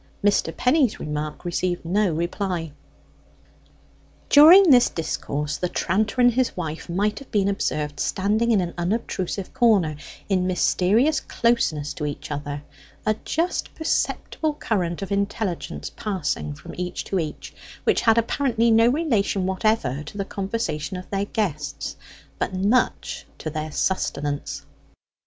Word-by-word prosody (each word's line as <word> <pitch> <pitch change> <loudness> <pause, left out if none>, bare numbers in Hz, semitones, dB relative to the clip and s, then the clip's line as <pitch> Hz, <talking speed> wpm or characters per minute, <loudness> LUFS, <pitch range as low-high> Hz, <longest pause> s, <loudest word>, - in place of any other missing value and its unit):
Mr. 200 -5 +2
Penny's 255 -2 +2
remark 150 +2 -4
received 175 0 -1
no 195 +2 +2
reply. 170 0 -2 1.6
During 330 +4 +9
this 245 -2 +6
discourse 150 -2 -3
the 180 - -2
tranter 210 +8 0
and 245 -1 +6
his 255 -3 0
wife 160 -2 -5
might 205 +5 0
have 275 - -13
been 200 -2 +1
observed 150 -7 -2
standing 210 +4 +1
in 215 -5 +4
an 175 -1 -3
unobtrusive 190 0 -2
corner, 215 - +3 0.3
in 185 -2 +1
mysterious 200 - +2
closeness 155 -12 0
to 150 - -3
each 145 +1 -6
other, 145 0 -4 0.4
a 215 - +3
just 340 +3 -1
perceptible 315 -1 -1
current 185 - -1
of 195 - -7
intelligence 200 -2 -2
passing 175 - -2
from - - -11
each 180 0 -3
to 190 - -1
each, 155 -3 -5 0.3
which - - +2
had 225 0 +4
apparently 230 -1 +2
no 225 +1 +6
relation 240 - +1
whatever 190 - 0
to 150 +7 -9
the 195 - -2
conversation 190 -5 -3
of 180 - -8
their 200 0 0
guests, 185 -9 -3 0.4
but - - -2
much 205 +7 0
to 155 - -5
their 155 0 -4
sustenance. 145 -4 -2
195 Hz, 135 wpm, -24 LUFS, 165-225 Hz, 1.6 s, During